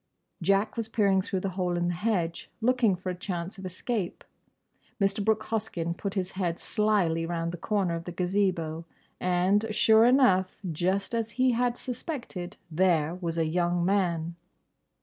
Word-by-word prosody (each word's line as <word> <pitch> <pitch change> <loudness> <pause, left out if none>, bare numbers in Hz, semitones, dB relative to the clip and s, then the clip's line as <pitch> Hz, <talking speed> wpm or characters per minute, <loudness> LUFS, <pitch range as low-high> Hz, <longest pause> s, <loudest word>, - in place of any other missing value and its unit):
Jack 195 +6 +2
was 230 -1 -2
peering 200 -4 +3
through 185 0 -3
the 195 - -1
hole 180 -1 -1
in 175 0 0
the - - 0
hedge, 175 -3 -1
looking 235 -3 +3
for 185 +1 -4
a - - -5
chance 180 0 -5
of 190 - -5
escape. 190 +1 -3 0.8
Mr. 195 +1 +1
Brooke 220 +1 +2
Hoskyn 210 -7 -2
put 200 +2 -4
his 190 -1 -1
head 175 -3 -2
slily 195 -6 +1
round 170 -1 -2
the 175 - -6
corner 195 -4 0
of 165 0 -4
the 175 - -5
Gazebo—and, 180 +2 0
sure 220 +1 +5
enough, 195 -8 +4
just 185 +7 -1
as 230 -1 0
he 255 0 +4
had 245 0 +1
suspected—there 180 - -2
was 170 -2 -4
a 165 - +2
young 175 +1 +1
man! 170 -4 0
185 Hz, 155 wpm, -28 LUFS, 175-215 Hz, 0.8 s, sure